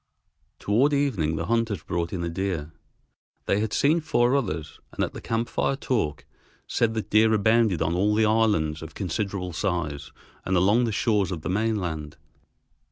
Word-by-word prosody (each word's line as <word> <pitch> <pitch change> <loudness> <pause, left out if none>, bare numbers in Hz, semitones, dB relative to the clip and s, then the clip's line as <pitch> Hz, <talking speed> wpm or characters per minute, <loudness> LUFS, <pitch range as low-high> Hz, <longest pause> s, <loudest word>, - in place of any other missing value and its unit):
Toward 125 +9 +2
evening 110 - +1
the - - -3
hunters 115 -3 0
brought 85 -1 -2
in 90 -3 -3
a - - -1
deer. 85 -3 -3 0.7
They 100 - +1
had 110 0 -1
seen 155 +4 +2
four 135 -5 +2
others, 80 - -3
and - - -1
at - - -9
the - - -8
camp 115 +1 -1
fire 135 - 0
talk 105 - -2 0.4
said 115 -1 0
that 110 - -4
deer 110 +1 +5
abounded 110 -3 +3
on 85 - 0
all 100 +4 +2
the 110 0 +3
islands 105 -9 +2
of 80 -1 -9
considerable 95 -1 -3
size 80 -6 -2 0.3
and 95 0 +1
along 105 +7 +4
the 115 - -1
shores 105 -2 +1
of 80 -4 -5
the - - -3
mainland. 90 -7 -2
100 Hz, 170 wpm, -25 LUFS, 85-115 Hz, 0.7 s, deer